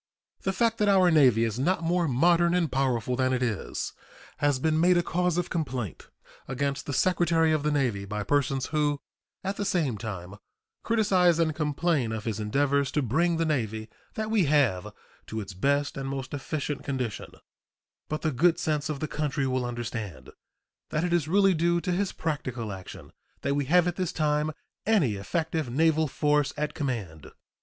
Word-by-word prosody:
The 195 - 0
fact 230 +3 +1
that 210 -1 +3
our 185 -3 +5
Navy 130 -8 +5
is 115 +1 -1
not 170 +5 +1
more 170 0 +1
modern 170 +6 +3
and 170 -3 +1
powerful 125 -3 0
than 130 0 +1
it 125 0 0
is 115 -5 -3 0.4
has 145 -2 +2
been 155 +3 +1
made 175 +2 +5
a 175 - +2
cause 180 0 0
of 175 0 -2
complaint 130 - -3 0.4
against 140 +2 -2
the - - -2
Secretary 165 +2 +3
of 155 -1 +2
the 150 - 0
Navy 125 -9 0
by 105 +1 -3
persons 135 +2 +1
who 145 -1 +1 0.4
at 195 +1 -3
the - - -1
same 165 - 0
time 100 -3 -6 0.4
criticise 190 -7 +3
and 165 -2 +2
complain 150 -4 0
of 110 -1 -4
his 110 -1 -3
endeavors 140 +5 +1
to 150 - +1
bring 165 +8 +1
the 165 - +1
Navy 110 -7 -2 0.3
that 220 0 -3
we 210 -6 +3
have 135 -11 +2 0.4
to 110 - -4
its 100 -2 -6
best 140 +9 0
and 135 0 -4
most 135 -1 -5
efficient 145 0 -3
condition; 130 -5 -4 0.7
but 155 - -3
the 155 - +1
good 165 +6 +3
sense 150 -1 -1
of 150 -3 -4
the 155 - -1
country 150 -1 -1
will 130 -1 0
understand 115 - -5 0.6
that 155 - -1
it 175 -1 0
is 170 -4 +1
really 195 +2 +4
due 170 +1 +2
to 180 - -2
his 190 +2 0
practical 130 -8 -3
action 95 -1 -10 0.3
that 140 - 0
we 145 0 0
have 175 +5 +4
at 175 - -2
this 185 -3 -1
time 150 0 0 0.3
any 195 - +3
effective 160 - -2
naval 160 +4 +2
force 145 0 +1
at 150 0 -2
command. 110 - -4
145 Hz, 180 wpm, -27 LUFS, 125-170 Hz, 0.7 s, our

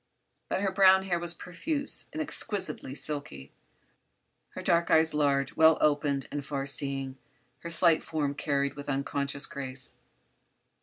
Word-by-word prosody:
But - - -1
her 195 -1 0
brown 190 0 +5
hair 180 -3 -1
was 170 0 -2
profuse 285 - -2
and 310 - -6
exquisitely 190 - -2
silky; 140 - -3 1.0
her - - -5
dark 170 0 +2
eyes 160 0 +3
large, 140 -2 +1
well 160 0 +5
opened 145 -2 +1
and 145 0 -4
far 140 -1 -4
seeing; 135 -1 +1 0.4
her 170 - -7
slight 165 -1 +4
form 145 -3 -2
carried 140 -1 -1
with 145 0 -8
unconscious 140 +1 -1
grace. 130 -2 -6
145 Hz, 140 wpm, -28 LUFS, 140-170 Hz, 1.0 s, brown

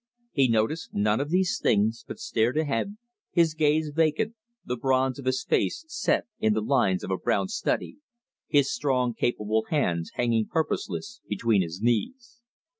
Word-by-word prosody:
He 135 -3 +3
noticed 115 +8 0
none 105 +2 +2
of 145 +1 -2
these 185 +2 +1
things, 110 +2 +2
but - - -7
stared 150 - 0
ahead, 155 - -1 0.3
his 165 -3 +3
gaze 155 0 +1
vacant, 165 +8 +1 0.3
the 125 - -2
bronze 130 +1 +1
of 135 - -8
his 130 0 0
face 325 - 0
set 355 - 0
in 110 -1 +3
the 110 - +1
lines 105 -8 +2
of - - -4
a 95 - +1
brown 190 - 0
study, 220 +5 -2 0.5
his 140 -2 +3
strong 125 -4 0
capable 110 -2 0
hands 85 - 0
hanging 115 -3 +1
purposeless 195 +7 -3
between 105 0 +2
his 85 +3 -5
knees. 235 - -1
130 Hz, 160 wpm, -26 LUFS, 110-160 Hz, 0.5 s, He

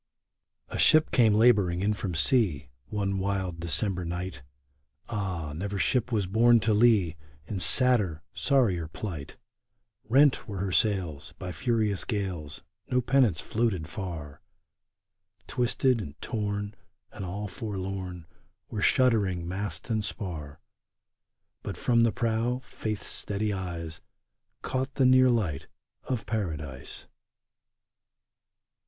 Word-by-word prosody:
A - - -4
ship 155 0 +5
came 110 -5 +5
laboring 105 -6 +4
in 105 +2 +2
from 95 -4 -4
sea, 85 - +2 0.2
One 100 -2 -1
wild 95 -3 -2
December 90 +3 0
night; 85 -4 -4 0.7
Ah! 95 -9 -3
never 100 +4 -3
ship 120 +7 +1
was 105 -4 +1
borne 115 +5 +5
to 110 0 +2
lee 105 -7 +4 0.3
In 95 +4 -4
sadder, 95 - +3
sorrier 110 - +2
plight! 80 -3 -7 0.7
Rent 140 +3 +4
were 100 -3 -5
her 95 0 -2
sails 85 -6 0
By 90 -2 -5
furious 110 -3 0
gales, 95 - -4 0.3
No 125 - +2
pennants 125 -9 +3
floated 105 -8 -1
far; 80 -5 -6 1.0
Twisted 125 0 +1
and 75 -6 -9
torn 105 -2 -3 0.4
And - - -7
all 100 +3 -4
forlorn 95 -5 -5 0.5
Were 105 - -3
shuddering 100 -11 +2
mast 100 +6 -4
and 110 -1 +1
spar! 80 -9 -6 1.0
But - - -6
from 120 -1 +3
the 115 -1 +4
prow 115 +2 0
Faith's 110 -2 -4
steady 105 +1 -2
eyes 85 -4 -5 0.6
Caught 130 +1 -2
the 135 - +3
near 130 0 +6
light 100 - 0 0.4
of 120 -5 -2
Paradise 80 - -4
100 Hz, 120 wpm, -28 LUFS, 85-115 Hz, 1.0 s, near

